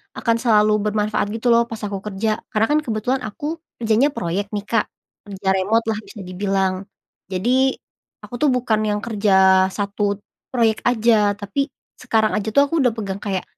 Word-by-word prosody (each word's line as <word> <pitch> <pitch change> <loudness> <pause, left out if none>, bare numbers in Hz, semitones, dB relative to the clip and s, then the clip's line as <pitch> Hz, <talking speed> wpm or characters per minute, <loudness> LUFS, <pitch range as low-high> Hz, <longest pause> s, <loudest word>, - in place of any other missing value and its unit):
akan 230 -1 +1
selalu 215 -3 +4
bermanfaat 210 -1 0
gitu 230 +2 -2
loh, 235 0 +5
pas 225 -1 -7
aku 200 -2 -4
kerja. 215 +1 -2
Karena 220 +1 +2
kan 300 - +4
kebetulan 245 +3 -1
aku, 295 +9 -5 0.2
kerjanya 235 +5 +2
proyek 200 -2 -3
nih 205 -1 -3
Kak. 230 -2 +1 0.4
Kerja 195 -1 -8
remote 215 +5 +1
lah 215 -1 -1
bisa - - -12
dibilang. 190 0 -1 0.5
Jadi, 255 +8 +2 0.5
aku 245 - -8
tuh 300 - +3
bukan 245 -4 +1
yang 210 -1 0
kerja 190 -4 +4
1 200 0 -2 0.3
proyek 230 -3 +1
aja, 220 -3 +3
tapi, 210 +8 -3 0.2
sekarang 220 -1 +1
aja 210 +1 -2
tuh, 280 +5 +4
aku 315 -2 +1
udah 245 - +3
pegang 200 -3 -4
kayak, 195 -3 -2
215 Hz, 170 wpm, -21 LUFS, 200-235 Hz, 0.5 s, loh